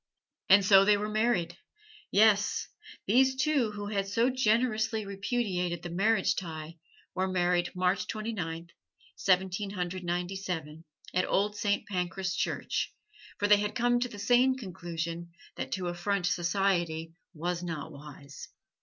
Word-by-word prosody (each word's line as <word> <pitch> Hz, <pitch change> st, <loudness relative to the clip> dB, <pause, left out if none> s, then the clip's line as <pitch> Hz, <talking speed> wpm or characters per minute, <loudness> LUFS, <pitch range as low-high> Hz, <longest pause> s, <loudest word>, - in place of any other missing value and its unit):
And 195 Hz, 0 st, +7 dB
so 195 Hz, 0 st, +7 dB
they 205 Hz, +1 st, +4 dB
were 210 Hz, +1 st, -2 dB
married; 200 Hz, -6 st, 0 dB, 0.5 s
yes, 210 Hz, -1 st, +3 dB, 0.4 s
these 260 Hz, +5 st, +4 dB
two 265 Hz, -3 st, +2 dB
who 205 Hz, 0 st, -5 dB
had 200 Hz, -1 st, -1 dB
so 230 Hz, +5 st, +2 dB
generously 220 Hz, -3 st, +1 dB
repudiated 195 Hz, -4 st, -2 dB
the 175 Hz, -, -5 dB
marriage 200 Hz, +3 st, +2 dB
tie 165 Hz, -2 st, -6 dB, 0.3 s
were 185 Hz, +1 st, 0 dB
married 175 Hz, -1 st, +1 dB
March 180 Hz, +1 st, +1 dB
Twenty 220 Hz, +1 st, -4 dB
ninth, 165 Hz, -3 st, -5 dB, 0.4 s
Seventeen 190 Hz, +1 st, +1 dB
Hundred 185 Hz, -1 st, -4 dB
Ninety 175 Hz, +2 st, -2 dB
seven, 160 Hz, -4 st, -5 dB, 0.3 s
at 185 Hz, +1 st, +2 dB
Old 205 Hz, +2 st, +1 dB
Saint 205 Hz, -1 st, 0 dB
Pancras 185 Hz, 0 st, -2 dB
Church, -, -, -1 dB, 0.5 s
for 205 Hz, -, +1 dB
they 210 Hz, 0 st, +7 dB
had 210 Hz, 0 st, -2 dB
come 245 Hz, +1 st, +2 dB
to 250 Hz, 0 st, -1 dB
the 210 Hz, -, -10 dB
sane 245 Hz, +5 st, +3 dB
conclusion 170 Hz, -5 st, -5 dB, 0.2 s
that 130 Hz, -, -5 dB
to 185 Hz, -1 st, -2 dB
affront 175 Hz, +2 st, -1 dB
society 170 Hz, -3 st, 0 dB, 0.2 s
was 175 Hz, +2 st, -2 dB
not 165 Hz, -2 st, -5 dB
wise. 145 Hz, -1 st, -11 dB
190 Hz, 145 wpm, -29 LUFS, 175-210 Hz, 0.5 s, And